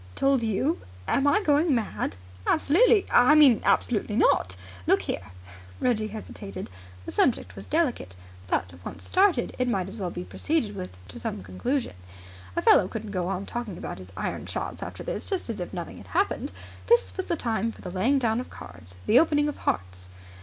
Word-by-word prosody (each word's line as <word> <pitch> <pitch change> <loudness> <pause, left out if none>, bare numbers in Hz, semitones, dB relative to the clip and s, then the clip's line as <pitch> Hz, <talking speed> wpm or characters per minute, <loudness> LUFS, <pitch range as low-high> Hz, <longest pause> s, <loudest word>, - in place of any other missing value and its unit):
"Told 275 -2 +3
you? 230 - 0 0.3
Am 275 - +2
I 415 +8 +3
going 295 -1 +3
mad?" 220 - -2 0.3
"Absolutely! 395 - +4
I 255 +5 +6
mean 280 -7 +7
absolutely 210 -3 +2
not! 95 - +3 0.3
Look - - +4
here." 95 0 -3 0.5
Reggie 220 -4 +1
hesitated. 200 - -7 0.3
The - - -5
subject 255 - +1
was - - -9
delicate. 285 - 0 0.3
But, 90 0 -1
once - - -7
started, 370 -10 +2
it 250 - +1
might 195 -6 0
as 195 +4 -8
well 190 -4 -2
be 175 - -5
proceeded 285 - -1
with 185 -2 -5 0.2
to 95 - -9
some - - -4
conclusion. 235 - -2 0.6
A - - 0
fellow 185 - +6
couldn't 220 0 -6
go 180 -3 -1
on 195 +1 -2
talking 235 -6 -5
about - - -6
his 95 0 -11
iron - - -3
shots - - -4
after - - -6
this - - -4
just 375 - -1
as 210 - -6
if 175 - -4
nothing 175 -2 -6
had - - -13
happened. 390 +5 0 0.4
This 475 +1 +3
was 375 - -3
the 340 - +1
time 230 -2 -1
for - - -14
the 180 - -5
laying 230 +10 +2
down 230 -3 +1
of 250 - -6
cards, 90 0 -11
the 240 - +6
opening 295 -2 +3
of 295 - -3
hearts. 90 0 -3
225 Hz, 190 wpm, -26 LUFS, 180-290 Hz, 0.6 s, mean